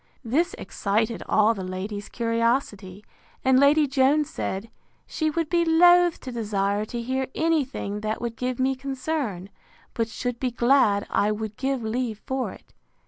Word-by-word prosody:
This 290 +9 0
excited 220 +3 -1
all 215 +1 +4
the 195 -4 -6
ladies' 200 +3 -5
curiosity; 230 -4 -1 0.4
and 260 0 +5
Lady 290 +2 +5
Jones 285 +3 +2
said, 205 -2 -4 0.3
She 315 -1 -1
would 330 +1 -1
be 340 +1 +2
loath 350 +1 +5
to 255 - -7
desire 205 -3 -1
to 240 +2 -5
hear 260 +2 -2
any 320 -2 +2
thing 210 -6 -5
that 215 +1 -3
would 235 -1 -4
give 250 +1 -3
me 265 +1 +2
concern; 260 - -4 0.4
but 230 -1 -1
should 245 +1 -4
be 255 - 0
glad 235 -4 +3
I 210 - +2
would 215 0 -4
give 265 -1 -2
leave 225 -1 -2
for 265 -1 -2
it. - - -16
240 Hz, 160 wpm, -25 LUFS, 215-275 Hz, 0.4 s, and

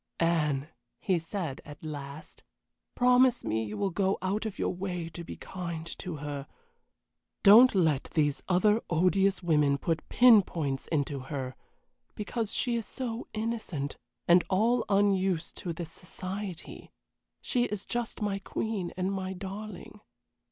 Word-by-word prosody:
"Anne," 150 -4 +1 0.3
he 185 -3 +1
said, 165 -4 -4
at 145 +1 -12
last, 145 -1 -8 0.5
"promise 250 0 +4
me 110 +1 0
you 105 -1 -5
will 195 - 0
go 190 +2 +1
out 205 +4 -1
of 210 - -7
your - - 0
way 180 -2 -4
to 170 +1 -8
be - - -8
kind 170 -3 -6
to 180 -4 -5
her. 145 -1 -5 1.0
Don't 220 +4 +8
let 160 -7 +2
these 145 -3 +2
other 210 +4 +3
odious 185 +3 +2
women 150 -4 +3
put 160 +2 -2
pin 240 -4 +7
points 145 -7 -3
into 145 -3 -1
her, 130 -1 -5 0.6
because 220 +1 -3
she 240 +1 +1
is 230 -2 -3
so 240 -2 -4
innocent, 215 -11 -3 0.3
and 175 +1 +6
all 230 +5 +3
unused 195 -4 +2
to 180 - -4
this 165 -1 -6
society. 185 +1 -7 0.5
She 245 -2 0
is 210 -4 -4
just 235 -3 -3
my 200 -1 -1
queen 200 -2 -3
and 185 +1 0
my 190 -1 -3
darling. 200 +1 -8
185 Hz, 145 wpm, -29 LUFS, 155-210 Hz, 1.0 s, Don't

